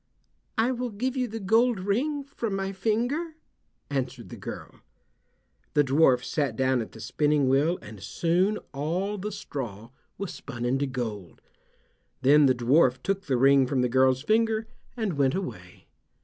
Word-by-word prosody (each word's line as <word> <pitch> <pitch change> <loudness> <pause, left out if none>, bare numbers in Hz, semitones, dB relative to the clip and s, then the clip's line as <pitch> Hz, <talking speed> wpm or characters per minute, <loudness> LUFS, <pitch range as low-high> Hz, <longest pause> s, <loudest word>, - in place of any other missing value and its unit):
"I 230 +3 +3
will 250 -1 -2
give 245 +5 -2
you 255 -1 0
the 225 0 -6
gold 225 +3 +3
ring 265 +10 -1
from 235 -7 -4
my 195 0 -2
finger," 240 - -1 0.5
answered 130 -3 -4
the - - -8
girl. - - -8 1.0
The 145 - +5
dwarf 135 -2 +4
sat 140 -7 -1
down 130 -1 +2
at 110 - -8
the 110 - -11
spinning 145 +5 +1
wheel, 145 +7 +3
and 105 -2 -10
soon 175 - +1 0.2
all 180 +9 -2
the 210 +3 -4
straw 120 - -6 0.3
was 200 -2 -5
spun 120 0 -6
into 135 +3 +1
gold. 110 -8 -5 0.8
Then 145 +2 +6
the 130 - +3
dwarf 125 +2 +3
took 195 0 -2
the 130 -3 +2
ring 135 +1 +5
from 130 -1 +1
the 125 - +1
girl's 130 +1 +3
finger 220 +2 +2 0.3
and 200 -10 -2
went 135 -1 +3
away. 100 - -7
150 Hz, 160 wpm, -27 LUFS, 130-210 Hz, 1.0 s, Then